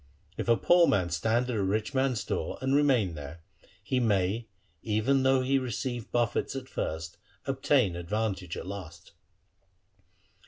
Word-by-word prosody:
If - - -4
a 115 - +5
poor 175 -1 +5
man 90 -4 +1
stand 110 +9 +1
at - - -2
a 105 - 0
rich 105 +5 -1
man's 130 -5 +1
door - - -3
and 130 +1 0
remain 130 - +3
there, 75 +2 -9 0.4
he 130 +5 0
may 105 0 +1 0.3
even 115 +5 +1
though 130 0 +3
he 135 +1 +2
receive 120 -1 -4
buffets 120 +2 0
at 130 -1 -5
first, 80 -8 -4 0.3
obtain 135 -7 +2
advantage 95 0 -3
at - - -6
last.' 85 -4 -8
110 Hz, 150 wpm, -29 LUFS, 95-130 Hz, 0.4 s, a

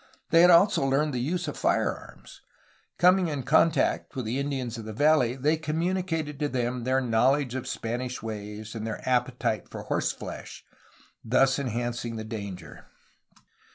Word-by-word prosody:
They 165 - +7
had 175 - +7
also 180 0 +5
learned 140 +2 +1
the 125 - -1
use 170 +7 -2
of 150 - -4
firearms. - - -2 0.6
Coming 180 0 +4
in 145 -4 -3
contact 160 +2 +2
with 130 -3 -3
the 120 +5 -2
Indians 135 -4 -3
of 110 - -8
the 110 - -6
valley 145 -2 +3
they 150 +4 +1
communicated 160 -1 -2
to 145 -1 0
them 125 -1 -2
their 130 +1 +2
knowledge 125 +2 +2
of 130 -1 -4
Spanish 125 +2 -4
ways 105 -1 -6
and 110 -1 -5
their 110 - -6
appetite 125 -3 0
for - - -7
horse - - 0
flesh, - - -9 0.6
thus 135 +4 +3
enhancing 120 -2 -3
the 110 - -5
danger. 100 -4 -8
130 Hz, 155 wpm, -27 LUFS, 115-150 Hz, 0.6 s, They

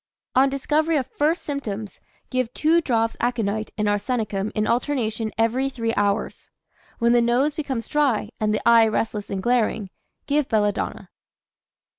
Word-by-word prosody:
On 265 +2 +4
discovery 305 +4 +1
of 265 - 0
first 300 +6 0
symptoms, 220 -8 -5 0.3
give 255 -2 0
2 325 +2 +3
drops 225 -6 0
aconite 220 -3 -1
and 210 -1 0
arsenicum 205 -1 -1
in 215 - +1
alternation 230 -3 -1
every 240 +4 +1
3 230 -4 -2
hours. 205 +1 -1 0.5
When 235 0 +3
the 240 - +5
nose 245 +5 +2
becomes 275 -6 -4
dry, 270 -8 +1
and 215 -1 +1
the 210 - -1
eye 230 -1 +7
restless 215 -1 -2
and 190 -1 -3
glaring, 225 -5 +1 0.3
give 290 -1 0
belladonna. 205 -2 -1
235 Hz, 145 wpm, -23 LUFS, 215-270 Hz, 0.5 s, eye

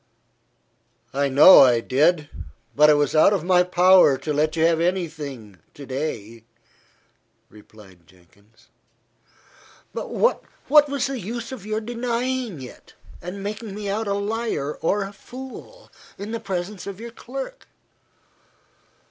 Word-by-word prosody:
"I 140 +1 0
know 145 +8 +8
I 125 -3 +5
did. 150 +6 +1 0.5
But 150 +1 +6
it 150 - +6
was 145 +1 0
out 155 +6 +5
of 195 - -1
my 180 0 +4
power 180 -5 +5
to 150 +3 -4
let 155 +2 0
you 160 0 +2
have 165 -1 +2
any 180 0 0
thing 130 - -10 0.2
to 140 - -10
day," 115 -5 -5 1.1
replied 100 -5 -18
Jenkins. 95 +5 -26 1.2
"But - - -5
what 485 - +1 0.5
was 280 -1 -1
the 270 -2 -4
use 235 +4 -6
of 220 -6 -9
your 215 0 -2
denying 240 - -3
it, 125 - -14 0.3
and 185 +3 -7
making 210 0 -6
me 205 -1 -5
out 215 +2 -2
a 200 - 0
liar 205 -8 -3
or 200 +5 0
a 195 +1 -8
fool, 265 - -12 0.3
in 205 +2 -7
the 230 - -3
presence 190 +1 -5
of 200 0 -7
your 235 +1 -8
clerk?" 270 - -8
180 Hz, 140 wpm, -22 LUFS, 140-220 Hz, 1.2 s, know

